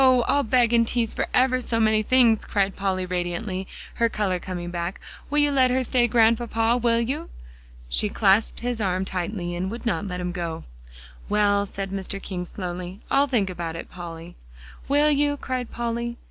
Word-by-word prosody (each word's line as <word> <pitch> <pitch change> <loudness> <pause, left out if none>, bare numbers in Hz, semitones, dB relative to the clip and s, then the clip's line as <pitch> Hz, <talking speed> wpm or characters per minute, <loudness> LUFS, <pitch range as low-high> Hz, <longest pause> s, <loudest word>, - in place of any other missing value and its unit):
I'll 260 +2 +4
beg 240 -1 +2
and 230 -1 +4
tease 235 -2 0
for - - -1
ever 255 0 +3
so 230 -2 -1
many 215 -1 +3
things," 235 -1 +4
cried 195 -2 0
Polly 190 -2 -1
radiantly, 180 +2 -3 0.3
her 230 - +4
color 195 -5 -1
coming 175 -1 -5
back. 175 +1 -3 0.3
"Will 295 - -1
you 290 -1 +4
let 260 -2 +4
her 260 +1 +1
stay, 245 -1 +2
Grandpapa 230 0 +3
will 235 -1 +2
you?" 275 +8 -2 0.6
She - - +1
clasped 205 +1 +2
his 240 -1 -2
arm 185 -1 0
tightly 180 -1 -3
and 185 +2 -2
would 235 +4 -7
not 215 -3 -1
let 180 -1 -4
him 180 0 -2
go. 170 -2 -4 0.7
"Well," 205 -1 +2
said 195 0 -5
Mr. 195 0 -4
King 180 -2 -5
slowly, 180 0 -6
"I'll 280 +1 +4
think 215 -8 +1
about 170 -2 -5
it, 165 - -8
Polly." 170 -1 -8 0.5
"Will 295 +2 +4
you?" 290 0 +2
cried 255 -3 -3
Polly. 235 0 -3
215 Hz, 180 wpm, -24 LUFS, 185-240 Hz, 0.7 s, I'll